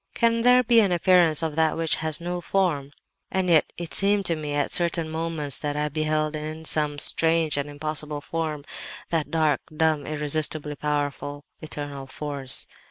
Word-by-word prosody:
"Can 230 0 +2
there 250 +1 +5
be 235 -1 +5
an 200 -4 +3
appearance 175 -3 +4
of 160 -2 -2
that 160 -1 +2
which 165 -1 +2
has 155 -2 -1
no 175 +1 -4
form? 170 -7 0 0.4
And 185 -2 0
yet 160 -2 +4
it 170 -1 -6
seemed 200 0 +3
to 170 - +3
me, 150 -2 -4
at 145 - 0
certain 170 -2 +1
moments, 160 -3 -1
that 145 -1 -3
I 150 0 -1
beheld 155 0 -1
in 155 +1 -6
some 150 -2 0
strange 160 +1 +2
and 145 0 0
impossible 150 0 -2
form, 155 -2 -4 0.5
that 160 -3 0
dark, 155 -4 +1 0.2
dumb, 155 -2 +1
irresistibly 150 0 0
powerful, 145 -1 -3 0.2
eternal 145 -3 -6
force. 140 -1 -3
155 Hz, 165 wpm, -25 LUFS, 145-165 Hz, 0.5 s, there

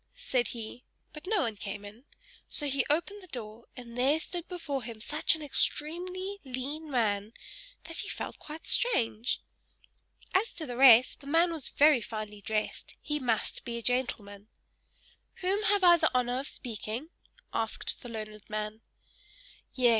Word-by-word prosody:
said 375 - 0
he; 230 +1 -7 0.3
but 305 +3 -10
no 420 -2 +2
one 230 -6 -1
came 200 +1 -6
in; 215 +6 -12 0.4
so 295 - -1
he 275 -1 +2
opened 345 +7 0
the 370 - -13
door, 230 -5 -7
and 235 -1 -9
there 270 +5 +3
stood 345 +1 -5
before 310 -7 -3
him 230 -1 -8
such 300 +8 +3
an 315 - -8
extremely 360 +7 0
lean 280 +4 -4
man, 215 -4 +1 0.5
that 330 0 -8
he - - -4
felt - - -5
quite 310 +1 -9
strange. 240 - +1 0.9
As 400 +5 +2
to 315 - -3
the 245 - -5
rest, 255 -1 +7
the 280 - -13
man 335 +4 +4
was 315 -5 -2
very 295 -4 +5
finely 215 -2 -6
dressed 215 +1 -2
he 295 0 -2
must 235 -5 0
be 235 -1 -3
a 235 - -6
gentleman. 215 -5 0 0.9
"Whom 385 +3 +1
have 405 -1 +3
I 345 -1 +8
the 320 -1 +3
honor 250 0 +2
of 275 - -4
speaking?" 235 +4 -4 0.4
asked - - -2
the 245 - -8
learned 215 -2 -7
man. 215 +1 -3 0.9
"Yes! 250 -2 +4
255 Hz, 160 wpm, -30 LUFS, 225-320 Hz, 0.9 s, I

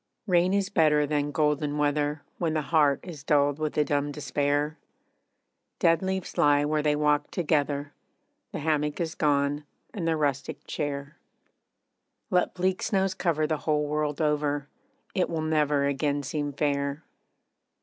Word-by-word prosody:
Rain 180 -2 +3
is 200 -1 +1
better 150 -6 +3
than 145 0 0
golden 150 0 0
weather, 145 0 0 0.2
When 160 -2 0
the 155 - 0
heart 145 -2 +3
is 160 -6 -9
dulled 145 0 +2
with 155 -1 -2
a 150 - +5
dumb 145 0 0
despair. 145 +1 -1 1.0
Dead 165 -3 +3
leaves 190 -1 -3
lie 145 0 +4
where 150 0 +1
they 150 0 +2
walked 150 0 +1
together, 145 -4 0 0.6
The - - -4
hammock 150 -1 0
is 165 -2 -2
gone, 145 0 +1 0.3
and 175 -6 -3
the 165 -1 +2
rustic 145 -2 -2
chair. 140 -1 -4 1.1
Let 180 -1 +2
bleak 185 0 0
snows 190 -2 +1
cover 165 -5 0
the 155 0 0
whole 150 -1 0
world 150 0 -1
over 150 -2 0 0.5
It 185 -3 +1
will 160 -2 -2
never 150 -2 +2
again 140 +1 0
seem 145 +1 -2
fair. 140 +1 -1
150 Hz, 150 wpm, -27 LUFS, 145-160 Hz, 1.1 s, a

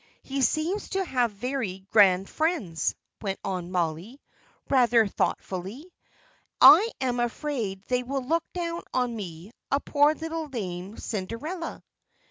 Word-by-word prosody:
He 275 0 -3
seems 325 +9 0
to 385 0 -1
have 250 -7 +1
very 205 -4 -4
grand 195 -3 +5
friends," 305 - -1 0.3
went 195 -2 -3
on 180 -3 -3
Molly, 180 - -2 0.5
rather 240 -4 +4
thoughtfully. 200 - -3 0.7
"I 450 - +9
am 250 -2 0
afraid 235 -5 -2
they 250 +3 0
will 265 +2 -3
look 325 +5 +1
down 340 -1 -3
on 250 -2 +1
me, 180 -2 -7 0.2
a 280 - +2
poor 290 +1 +3
little 325 0 -4
lame 195 -5 -5
Cinderella." 235 - -5
245 Hz, 125 wpm, -27 LUFS, 195-300 Hz, 0.7 s, I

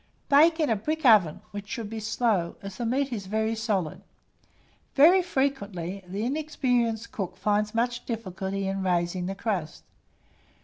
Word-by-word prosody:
Bake 320 +4 +6
in 305 -6 +2
a - - +3
brick 305 +9 -3
oven, 195 -7 +5
which 205 0 -7
should 230 -4 -4
be 225 +1 -5
slow, 215 -5 0
as 195 -1 -7
the 235 - -2
meat 265 +2 0
is 200 -4 -5
very 220 +2 0
solid. 210 -8 -2 0.9
Very 340 +7 +7
frequently, 200 - -2
the 200 +5 -3
inexperienced 245 -6 -1
cook 185 -3 -5
finds 210 +2 0
much 240 +1 0
difficulty 195 -3 -3
in 195 0 -2
raising 180 0 0
the 195 - -3
crust. 195 -7 -3
215 Hz, 150 wpm, -27 LUFS, 195-245 Hz, 0.9 s, Very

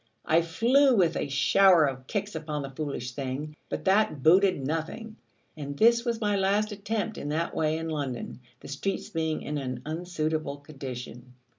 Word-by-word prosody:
I 165 +2 +4
flew 245 - +3
with 180 -6 +3
a - - -2
shower 175 +4 +5
of 130 -2 -4
kicks 205 0 -3
upon 150 -2 -4
the 135 - -6
foolish 135 -3 -4
thing: 140 +3 -5
but - - -4
that 190 -8 +2
booted 180 -3 +4
nothing; 165 - -4 0.4
and 140 -2 -6
this 235 +4 +5
was 235 -2 -1
my 205 -2 +1
last 200 +2 +1
attempt 210 +1 -3
in 145 - -4
that 165 +3 -1
way 155 0 +1
in 165 0 -4
London, 140 -7 -4 0.2
the - - -10
streets 180 +8 -3
being 160 -1 -2
in 150 0 -3
an 130 -2 -5
unsuitable 155 -3 -2
condition. 125 -4 -9
160 Hz, 170 wpm, -27 LUFS, 140-195 Hz, 0.4 s, shower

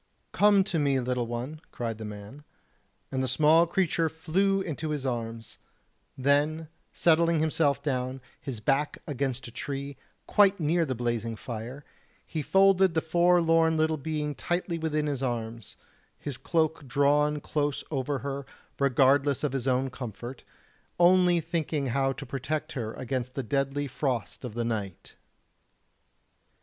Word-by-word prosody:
"Come 205 -1 +5
to 175 -3 -1
me, 140 -2 +2
little 125 -1 -1
one," 125 +7 -5
cried 115 -2 -4
the 110 - -5
man, 105 +7 -9 0.7
and 130 - -1
the 130 - 0
small 155 +6 +5
creature 170 -2 +1
flew 190 +5 +1
into 160 -4 -4
his 145 -3 -3
arms; 115 -3 -4 0.6
then 145 +4 +1 0.2
settling 165 0 +3
himself 145 -3 +1
down, 130 -2 -2 0.2
his 125 -6 -5
back 135 +6 +1
against 135 -3 -2
a - - -10
tree, 140 +3 -5 0.3
quite 200 -1 +4
near 165 +2 +2
the 130 - -2
blazing 115 -1 -2
fire, 120 +5 -7 0.4
he 155 - -3
folded 190 0 +4
the - - +4
forlorn 165 -1 +3
little 155 0 +2
being 150 0 -3
tightly 175 +2 -2
within 155 -1 0
his 140 -3 -2
arms, 115 -3 -4 0.4
his 145 -3 -5
cloak 160 0 0
drawn 145 +3 +2
close 145 -1 -1
over 140 0 -1
her, 140 -1 -4 0.3
regardless 140 +1 +3
of 145 -3 0
his 135 -1 -2
own 130 0 +1
comfort, 120 0 -7 0.6
only 175 0 +5
thinking 160 -3 -2
how 135 0 +2
to 140 +1 -7
protect 140 +5 -3
her 115 -5 -4
against 130 0 -4
the 135 - -2
deadly 140 +4 -1
frost 130 -7 -3
of 120 -4 -6
the 120 -1 -1
night. 105 -6 -4
140 Hz, 145 wpm, -28 LUFS, 125-160 Hz, 0.7 s, Come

